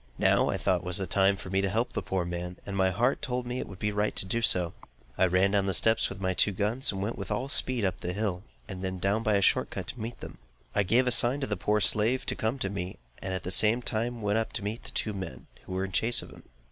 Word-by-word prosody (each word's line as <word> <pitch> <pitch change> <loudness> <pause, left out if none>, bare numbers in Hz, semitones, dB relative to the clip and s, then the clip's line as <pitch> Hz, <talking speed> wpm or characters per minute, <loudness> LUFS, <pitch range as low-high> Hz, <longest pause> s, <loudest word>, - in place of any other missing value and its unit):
Now, - - +3
I - - 0
thought, - - 0
was 90 +1 -1
the 95 - -2
time 95 +2 +3
for 95 -1 -9
me 95 0 +2
to 100 - 0
help 115 +5 -1
the - - -2
poor 95 -2 -2
man, 90 +1 -5
and 100 - -5
my 95 -1 +3
heart 120 +8 0
told 125 -1 -3
me 125 +1 -3
it - - -5
would 95 - -10
be 105 +2 -1
right 105 +1 -1
to - - 0
do 115 +5 -1
so. 90 -6 +2 0.4
I 95 - +3
ran 90 +2 +2
down 100 -1 +1
my 95 - 0
steps 110 +5 +3
with 100 - -8
my 95 -1 -1
two 100 +3 +2
guns, 110 +8 0
and 95 -1 -4
went 110 +3 -4
with - - -6
all 110 +6 -2
speed 125 -5 +3
up 95 -1 -2
the 90 - -3
hill, 100 -3 -2 0.3
and 95 -3 -7
then 95 0 -3
down 100 +4 0
by 110 -2 +1
a 100 - +2
short - - +3
cut - - -5
to 125 +1 -7
meet 115 +2 -6
them. - - -10 0.3
I 105 - +2
gave 115 +7 +3
a 125 - +1
sign 120 +3 +5
to - - 0
the 105 - -2
poor 105 +3 0
slave 110 +6 +4
to - - -2
come 110 +5 -1
to 100 -7 -2
me, 95 -2 -5 0.2
and 95 - -4
at 90 - -4
the 90 - -3
same 110 +5 +4
time 115 +1 -2
went 105 +2 +1
up 115 - -3
to - - -4
meet 105 +3 -5
the - - -8
two 110 - -2
men, 95 -10 -7 0.2
who - - -7
were 95 +1 -1
in 95 - -8
chase 115 +6 +2
of - - -12
him. - - -14
100 Hz, 295 wpm, -28 LUFS, 95-115 Hz, 0.4 s, sign